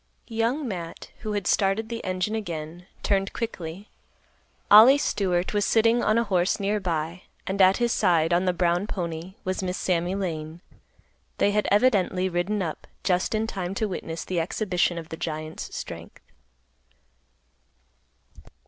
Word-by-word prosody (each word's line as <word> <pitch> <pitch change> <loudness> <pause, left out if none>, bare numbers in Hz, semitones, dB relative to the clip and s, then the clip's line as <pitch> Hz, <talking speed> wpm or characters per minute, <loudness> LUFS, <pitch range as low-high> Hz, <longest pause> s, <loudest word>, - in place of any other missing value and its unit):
Young 235 +6 0
Matt, 175 -6 -6
who 215 -2 -4
had 205 -3 -2
started 200 +4 +2
the 230 0 -5
engine 185 +3 -1
again, 175 -4 -5 0.2
turned 195 -1 +1
quickly. 195 -4 -5 0.8
Ollie 225 +7 +10
Stewart 185 -9 0
was 205 0 +2
sitting 230 +2 +3
on 215 +1 +3
a 235 - +3
horse 185 -2 +1
near 205 +1 0
by, 170 -1 -2 0.2
and 195 +1 0
at 190 +1 +6
his 240 -1 +1
side, 170 -6 +2
on 175 +2 +2
the 180 - +3
brown 175 +2 +1
pony, 170 -1 -5
was 185 +1 -2
Miss 185 -1 -2
Sammy 180 +1 0
Lane. 165 -4 -4 0.8
They 205 - +3
had 210 0 +1
evidently 200 -4 +3
ridden 185 +3 -1
up 160 -3 -5 0.2
just 185 +3 +1
in 215 +1 +1
time 190 -4 -4
to 215 +1 0
witness 165 -3 -5
the 180 -2 -1
exhibition 180 -1 0
of 165 -1 -7
the 160 - -6
giant's 155 0 -5
strength. - - -8
185 Hz, 150 wpm, -25 LUFS, 175-210 Hz, 0.8 s, Ollie